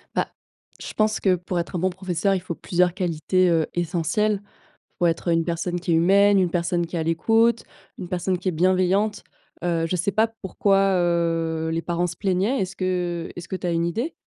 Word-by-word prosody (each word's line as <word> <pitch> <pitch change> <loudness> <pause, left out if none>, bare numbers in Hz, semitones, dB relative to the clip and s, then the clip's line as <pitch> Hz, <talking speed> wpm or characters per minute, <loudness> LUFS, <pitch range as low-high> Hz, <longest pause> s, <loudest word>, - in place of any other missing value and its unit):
Bah, - - +1 0.5
je - - -7
pense 215 0 +1
que 190 -2 +3
pour 180 0 -3
être 170 +2 -4
un - - 0
bon 185 +2 +1
professeur 185 +1 -1
il 185 - -2
faut 175 -2 -5
plusieurs 180 +1 +1
qualités, 180 0 +1
heu, 165 -2 +2
essentielles: 175 +5 0 0.6
faut 175 - +2
être 170 +1 0
une 165 0 +2
personne 175 +1 -2
qui 175 0 -3
est - - +4
humaine, 200 +4 +5
une 180 -2 +2
personne 175 0 0
qui 170 - -7
est - - 0
à - - 0
l'écoute, 225 +8 +2 0.3
une 180 -3 -7
personne 180 0 -1
qui 185 - -6
est - - -1
bienveillante. 185 +4 +1 0.4
Heu, 170 -2 0
je 180 - -1
sais 180 +3 0
pas 220 +4 +3
pourquoi 195 -2 +1
heu 165 -2 0
les 165 0 -1
parents 175 +1 -1
se 175 - -6
plaignaient. 195 +7 0
Est-ce 190 +1 -3
que 180 -2 -2
est-ce 175 - -8
que - - -4
tu 180 - -4
as - - 0
une 170 0 +1
idée? 230 - -2
180 Hz, 215 wpm, -23 LUFS, 170-195 Hz, 0.6 s, humaine